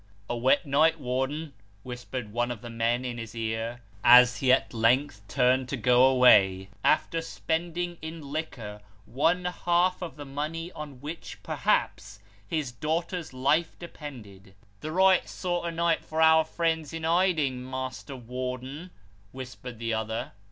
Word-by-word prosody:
" 100 0 -31
A - - -1
wet 130 +4 +2
night, 155 +3 +3
Warden," 135 +4 -2 0.3
whispered 125 -3 -6
one 120 +1 0
of 120 -4 -5
the 120 - -7
men 115 +2 0
in 120 -1 -4
his 115 0 -8
ear, 115 +1 -3 0.2
as 125 0 +8
he 130 -2 +3
at 130 - +2
length 115 +1 +2
turned 130 +1 +2
to 135 - -2
go 125 +2 +5
away, 100 -8 +5
after 165 +1 +2
spending 170 +1 -3
in 160 -3 -8
liquor 115 -9 -5 0.2
one 165 - +1
half 180 +1 +1
of 175 -3 -6
the 145 -1 -8
money 155 +5 -4
on 145 -6 -9
which, 155 +4 -7
perhaps, 100 0 -1 0.3
his 150 0 -2
daughter's 165 - -3
life 140 +6 +1
depended. 110 - -11
" 100 0 -34
The 155 - -5
right 190 +2 +4
sort 175 -2 -2
of 165 - -4
night 170 0 +1
for 160 - -4
our 160 0 +6
friends 160 -2 -1
in 165 0 -5
hiding, 160 -7 +1
Master 130 +1 -6
Warden," 130 +6 -6 0.4
whispered 125 -2 -8
the 115 0 -2
other. 110 0 -3
135 Hz, 155 wpm, -27 LUFS, 120-160 Hz, 0.4 s, as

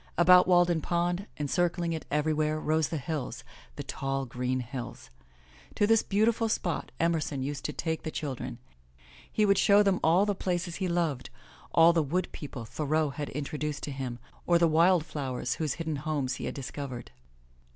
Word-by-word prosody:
About 180 +1 +7
Walden 175 -2 +4
Pond, 175 +4 -1
encircling 170 +3 0
it 160 - -5
everywhere, 155 +1 +1
rose 155 0 +1
the 165 - -2
hills, 145 -1 -4 0.3
the - - -5
tall, 135 0 -3
green 125 +1 -2
hills. 125 +1 -7 0.6
To 205 - +3
this 225 +1 +4
beautiful 225 +2 +1
spot 175 -5 -2
Emerson 160 -5 0
used 140 0 -4
to - - -1
take 160 +1 -3
the - - -4
children. 135 -6 -5 0.7
He 215 - +2
would 200 -1 +4
show 205 +1 +6
them 195 -2 +2
all 170 +5 +4
the 205 - +1
places 175 -2 -2
he 190 - -1
loved, 165 -7 -1 0.4
all 165 0 +6
the 165 - +3
wood 175 +5 -1
people 135 -5 -7
Thoreau 155 +4 0
had 145 +1 -5
introduced 150 +1 -4
to 145 - -3
him, 130 -3 -4 0.3
or 175 - +5
the 170 0 +4
wildflowers 155 -7 +1
whose 155 -3 0
hidden 160 -3 -3
homes 145 -3 -2
he - - -5
had - - -4
discovered. 135 -3 -6
155 Hz, 170 wpm, -29 LUFS, 140-175 Hz, 0.7 s, About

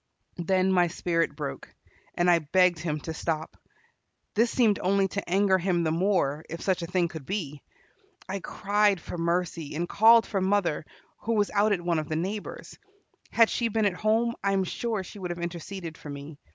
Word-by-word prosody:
Then 185 +2 +2
my 180 -2 +4
spirit 165 -3 -1
broke, 70 - -6 0.4
and 175 - +1
I 175 -1 +5
begged 175 +2 +3
him 155 -2 -2
to 160 - -5
stop. 160 -1 -3 0.8
This 230 +3 +3
seemed 225 -6 +2
only 195 +1 +2
to 200 -2 -5
anger 190 0 +3
him 175 -1 +1
the 160 - +1
more, 165 -4 +1
if 165 - -5
such 185 -2 0
a 170 - -4
thing 180 0 +1
could 160 -3 -8
be. 150 -5 -4 0.7
I 195 +1 -3
cried 205 0 +1
for 170 - -7
mercy, 170 -3 -1
and 170 +2 -2
called 225 +3 +6
for 195 -3 -2
mother, 190 -5 +1 0.3
who 230 - -2
was 205 -1 +1
out 210 +1 +3
at 190 -4 +1
one 170 -2 0
of 155 - -5
the 155 - -1
neighbor's. 195 +6 -5 0.5
Had 230 -1 +4
she 235 - 0
been 220 -1 0
at 200 - +2
home, 220 +4 +1
I 200 0 +2
am 195 -1 +2
sure 215 +2 -2
she 205 - -11
would 180 -2 -4
have 175 - -4
interceded 170 0 -6
for 150 - -9
me. 145 +1 -8
180 Hz, 195 wpm, -27 LUFS, 165-205 Hz, 0.8 s, called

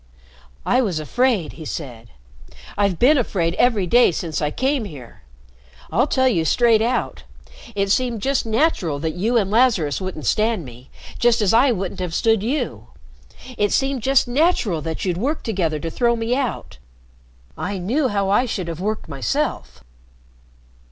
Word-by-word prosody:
"I 250 - +3
was 190 -10 -1
afraid," 220 - 0
he 160 - -10
said. 120 -7 -7 0.7
"I've 200 -3 +1
been 275 - +4
afraid 170 -8 -1
every 230 -6 +3
day 240 +4 +4
since 165 -1 -4
I 150 - 0
came 265 - -1
here. 140 - -11 0.7
I'll 240 - +2
tell 260 -2 +2
you 180 -10 +2
straight 230 +6 +3
out. 245 +3 -1 0.5
It 200 -1 0
seemed 240 -2 0
just 275 -1 +1
natural 220 - 0
that 160 +2 -3
you 220 +8 0
and 200 -3 0
Lazarus 210 - +2
wouldn't 185 -7 -5
stand 215 - +1
me, 125 +1 -13 0.3
just 240 -1 +3
as 210 -2 +2
I 250 +4 +5
wouldn't 190 -5 -3
have 180 -2 -3
stood 225 -3 +2
you. 260 +8 -3 0.7
It 205 -1 +2
seemed 270 -2 0
just 270 +2 +3
natural 245 - +1
that 160 +4 -4
you'd 180 -2 -1
work 280 - -2
together 180 -8 -1
to 165 - -4
throw 235 +3 +1
me 230 +1 -1
out. 255 - -4 0.8
I 200 +1 -4
knew 245 +11 0
how 200 -3 -1
I 210 +6 +2
should 185 -6 -3
have 165 -1 -6
worked 215 +3 -3
myself. 105 - -3
205 Hz, 165 wpm, -21 LUFS, 165-245 Hz, 0.8 s, I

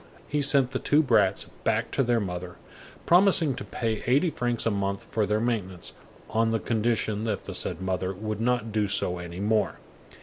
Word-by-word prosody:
He 150 0 0
sent 135 -2 +3
the 130 - -2
two 150 +2 +3
brats 105 -7 +2 0.2
back - - 0
to - - +1
their 120 -2 +2
mother, 90 -3 -5 0.5
promising 175 -5 +5
to - - -6
pay 110 -3 -3
eighty 145 +7 +3
francs 120 -5 -1
a 115 - +2
month 100 -1 -2
for 110 -2 -1
their 105 +2 +1
maintenance, 100 -7 -3 0.3
on 115 0 +1
the 115 0 0
condition 110 -2 0
that 110 -3 -2
the - - -6
said - - -3
mother 95 0 -1
would 105 +2 -4
not 120 -2 0
do 105 -1 +1
so 90 -3 +1
any 85 0 -7
more. 105 -1 +1
110 Hz, 190 wpm, -27 LUFS, 100-120 Hz, 0.5 s, promising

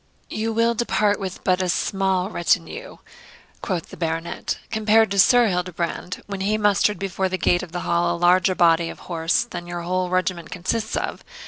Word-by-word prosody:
'You 225 +1 -2
will 230 +1 +2
depart 215 -3 +1
with 190 -1 -6
but 185 0 +2
a 185 - -1
small 190 +1 0
retinue,' 190 - -1 0.6
quoth 180 -6 -3
the - - -10
Baronet, 165 0 -3
'compared 220 -1 +3
to 200 - 0
Sir 245 +5 +6
Hildebrand, 180 -2 -3
when 200 -1 -6
he 210 +2 +1
mustered 205 -1 +2
before 190 0 -2
the 185 - -2
gate 175 -1 +2
of 180 -3 -9
the 175 0 -4
Hall 170 0 +1
a 175 - -2
larger 180 +1 +3
body 165 -1 +3
of - - -10
horse 165 +6 0
than 175 -7 -8
your 175 0 -5
whole 180 +1 -1
regiment 185 -2 -1
consists 220 +5 -2
of. - - -4
185 Hz, 185 wpm, -22 LUFS, 175-205 Hz, 0.6 s, Sir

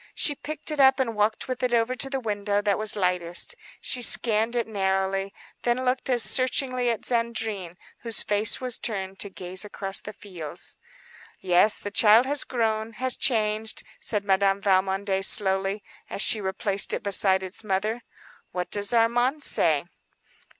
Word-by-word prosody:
She 290 - +1
lifted 310 0 -5
it 265 -1 +6
and 230 -4 -2
walked 210 +1 -1
with 255 0 -5
it 250 -1 0
over 230 +2 0
to 270 +2 0
the 270 -1 -3
window 205 -3 -2
that 205 -1 -1
was 215 -1 +1
lightest. 180 - -1 0.3
She 250 - -1
scanned 225 -1 +2
the 240 -1 0
baby 225 - -16
narrowly, 195 -1 -1 0.3
then 245 +2 -1
looked 255 +1 -1
as 245 -3 +4
searchingly 255 -1 0
at 230 -3 -3
Zandrine, 225 -7 -2 0.2
whose 230 -2 0
face 210 +1 +2
was 250 -2 -4
turned 195 -3 -4
to 200 - -3
gaze 185 0 -4
across 195 -2 -2
the 210 - -8
fields. 175 -6 -8 0.6
"Yes, 185 +3 +3
the 205 - -7
child 220 +3 +5
has 285 +1 +1
grown, 225 -2 -2
has 255 +3 -1
changed," 220 -3 -1 0.2
said 205 -2 -3
Madame 195 0 +1
Valmondé, 195 0 0
slowly, 195 +1 +6 0.3
as 200 - -1
she 215 - +3
replaced 195 +1 0
it - - -3
beside 190 -1 +2
its 185 +4 -3
mother. 210 +4 -2 0.5
"What 180 -1 -5
does 205 +3 -1
Armand 245 +5 +1
say?" 155 - +2
210 Hz, 165 wpm, -24 LUFS, 195-240 Hz, 0.6 s, it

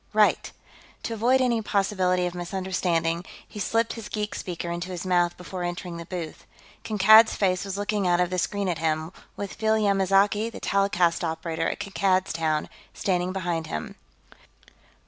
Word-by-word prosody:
"Right." 210 -1 +3 0.5
To 230 - -3
avoid 245 +4 +3
any 240 -3 +2
possibility 190 -3 +1
of 175 - -3
misunderstanding, 175 -2 -1 0.2
he 210 - -9
slipped 225 +4 0
his 225 -2 -8
geek 210 -1 -3
speaker 175 -1 -5
into 175 +2 -4
his 180 0 -5
mouth 175 -1 +2
before 180 +1 -7
entering 175 0 -4
the 170 0 -8
booth. 170 -4 -6 0.4
Kankad's 220 +1 +6
face 185 -2 +1
was 195 -1 -5
looking 205 -1 -1
out 175 0 +3
of 180 0 +1
the 185 - 0
screen 200 +2 -1
at 170 -3 -1
him, 160 0 -1 0.3
with 200 - -5
Phil 220 0 +1
Yamazaki, 200 +1 +2
the - - -8
telecast 180 -4 +1
operator 165 0 -2
at - - -5
Kankad's 190 -2 0
Town, 160 -2 0 0.3
standing 180 -1 0
behind 175 -4 -2
him. 75 - -5
185 Hz, 165 wpm, -25 LUFS, 175-205 Hz, 0.5 s, Kankad's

